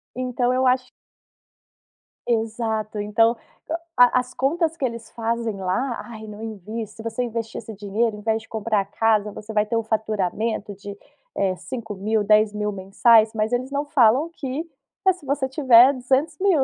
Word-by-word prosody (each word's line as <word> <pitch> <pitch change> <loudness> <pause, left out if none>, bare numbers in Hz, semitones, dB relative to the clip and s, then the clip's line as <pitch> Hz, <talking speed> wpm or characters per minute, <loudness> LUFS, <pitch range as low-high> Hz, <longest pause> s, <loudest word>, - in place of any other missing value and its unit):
Então 250 0 0
eu 260 +1 +1
acho 255 0 +1 1.4
Exato. 220 -2 -1
Então 225 +3 +3 0.6
a 245 +1 +6
as 250 0 -6
contas 330 +4 0
que 270 - -1
eles 235 -2 -5
fazem 230 -1 -2
lá: 235 +7 -1
"Ai, 220 -2 -9
não 210 0 -9
envie, 220 +1 -5
se 220 +2 -12
você 230 +2 -2
investir 230 -1 -4
esse 220 - -9
dinheiro 210 +3 -1
em - - -10
vez 220 +1 0
de - - -20
comprar 220 -1 0
a - - -6
casa, 210 0 +1
você 215 +2 -9
vai 210 0 +2
ter 230 - -2
o 230 - +1
faturamento 215 -1 -2
de, 200 +1 -9 0.4
eh, 190 -1 +1
de 180 - -13
5.000, 215 0 -2
10.000 210 0 +2
mensais", 215 +3 +4
mas 215 0 -1
eles 255 +2 -1
não 285 +1 -1
falam 275 +2 +4
que 280 +1 -4 0.4
mas 380 - +5
se 360 - -17
você 275 0 0
tiver 260 -1 +6
200.000, 290 +6 +1
225 Hz, 170 wpm, -23 LUFS, 215-255 Hz, 1.4 s, a